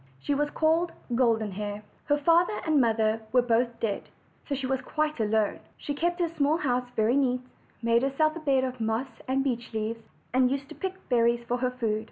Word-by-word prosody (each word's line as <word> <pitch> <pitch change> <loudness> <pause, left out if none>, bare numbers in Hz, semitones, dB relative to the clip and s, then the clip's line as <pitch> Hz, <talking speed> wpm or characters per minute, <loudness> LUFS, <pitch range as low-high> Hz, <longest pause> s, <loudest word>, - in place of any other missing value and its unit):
She 285 - -1
was 295 +1 +1
called 325 +3 +1 0.2
Golden 230 -4 +2
Hair. 205 +1 -5 0.2
Her 290 - +2
father 335 +7 +3
and 310 -3 +4
mother 220 -1 +2
were 250 0 +4
both 235 0 +1
dead, 210 -3 -2 0.4
so 285 - -1
she 270 0 -3
was 265 0 0
quite 305 +1 -1
alone. 215 -1 +1 0.2
She 290 - -4
kept 345 +4 -1
her 345 - +2
small 310 -1 +1
house 250 -6 -1
very 220 +3 +3
neat, 255 -3 +2 0.4
made 230 0 +3
herself 310 +4 +1
a - - -5
bed 275 -4 +2
of 255 -2 -3
moss 225 +4 -2
and 265 +1 +1
beech 240 -4 -2
leaves, 220 +1 -2 0.3
and 255 0 +4
used 275 +1 -3
to - - -8
pick 380 -1 -5
berries 235 -1 +3
for 245 - 0
her 250 0 0
food. 230 -4 -1
255 Hz, 205 wpm, -28 LUFS, 230-290 Hz, 0.4 s, and